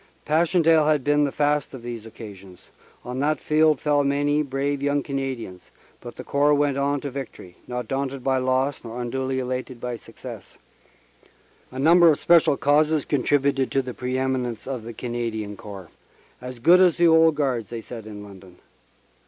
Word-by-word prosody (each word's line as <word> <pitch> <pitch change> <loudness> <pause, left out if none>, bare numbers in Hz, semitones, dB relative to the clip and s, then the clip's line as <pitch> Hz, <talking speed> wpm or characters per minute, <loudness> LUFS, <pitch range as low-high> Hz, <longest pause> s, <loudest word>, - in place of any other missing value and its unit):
Pass 160 +2 +2
chendaele 165 -3 +4
had 150 -3 +2
been 145 +1 +3
the 140 - -2
fast 145 -1 0
of 120 - -11
these 115 -2 -7
occasions. 100 -5 -12 0.4
On 125 +1 -5
that 150 +1 0
field 155 -2 +2
fell 145 -2 +2
many 145 +1 +1
brave 140 0 -2
young 145 0 0
Canadians, 135 -9 -5 0.3
but - - -10
the - - -8
Corps 145 +1 +2
went 145 -1 +1
on 140 0 0
to 140 - -5
victory, 125 -9 -8
not 125 -2 -4
daunted 135 0 -3
by 130 0 +1
loss 130 +2 0
nor 115 +1 -7
unduly 130 +2 -2
elated 130 -1 -4
by 125 0 -4
success. 115 - -11 1.1
A 130 - -9
number 170 +5 +6
of 150 - +3
special 170 -4 +4
causes 150 +2 +2
contributed 140 -1 +1
to 135 - 0
the 125 -1 -6
pre 125 +1 -3
eminence 130 -4 -2
of 130 -3 -4
the 115 +1 -8
Canadian 115 -3 -4
Corps 100 -4 -10 0.5
"As 125 0 -8
good 170 +10 +5
as 180 -3 +4
the 175 - +4
old 160 -1 +5
Guards," 130 -7 -1
they 115 -1 -6
said 110 -1 -9
in 105 -1 -9
London. 95 -3 -14
135 Hz, 175 wpm, -23 LUFS, 120-145 Hz, 1.1 s, number